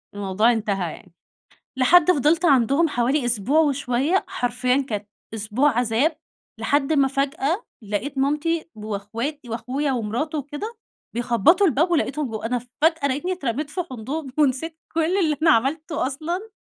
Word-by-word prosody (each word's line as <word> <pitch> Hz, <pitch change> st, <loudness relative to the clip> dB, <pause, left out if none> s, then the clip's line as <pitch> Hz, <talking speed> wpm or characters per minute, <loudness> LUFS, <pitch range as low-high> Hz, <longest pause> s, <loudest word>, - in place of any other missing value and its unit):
الموضوع 205 Hz, +3 st, +2 dB
انتهى 200 Hz, -7 st, -1 dB
يعني. 180 Hz, -, -15 dB, 0.6 s
لحد 315 Hz, +7 st, +5 dB
فضلت 310 Hz, +3 st, +2 dB
عندهم 275 Hz, +2 st, +4 dB
حوالي 260 Hz, +1 st, +1 dB
أسبوع 240 Hz, +6 st, +2 dB
وشوية، 280 Hz, +3 st, +1 dB
حرفيًا 250 Hz, +1 st, 0 dB
كانت 210 Hz, -2 st, -4 dB, 0.3 s
أسبوع 220 Hz, +7 st, +1 dB
عذاب، 250 Hz, +7 st, +1 dB, 0.4 s
لحد 285 Hz, +1 st, +1 dB
ما 280 Hz, -3 st, +4 dB
فجأة 275 Hz, -, -1 dB, 0.2 s
لقيت 215 Hz, +7 st, -3 dB
مامتي 300 Hz, +5 st, 0 dB
وإخواتي 220 Hz, +6 st, -5 dB
وأخويا 265 Hz, +5 st, -2 dB
ومراته 250 Hz, +7 st, -2 dB
وكده 295 Hz, -, -6 dB, 0.4 s
بيخبطوا 250 Hz, -, +3 dB
الباب، 325 Hz, +2 st, +2 dB
ولقيتهم 300 Hz, -4 st, 0 dB
ب -, -, -7 dB
أنا 225 Hz, +3 st, -1 dB
فجأة 285 Hz, +5 st, 0 dB
لقيتني 290 Hz, +8 st, -1 dB
اترميت 285 Hz, -4 st, -3 dB
في 360 Hz, -, -2 dB
حضنهم 265 Hz, +4 st, -5 dB
ونسيت 305 Hz, +3 st, +1 dB, 0.2 s
كل 330 Hz, +3 st, +1 dB
اللي 310 Hz, -6 st, +2 dB
أنا 325 Hz, -, +6 dB
عملته 300 Hz, +4 st, +1 dB
أصلًا. 340 Hz, +10 st, -4 dB
275 Hz, 135 wpm, -23 LUFS, 235-315 Hz, 0.6 s, أنا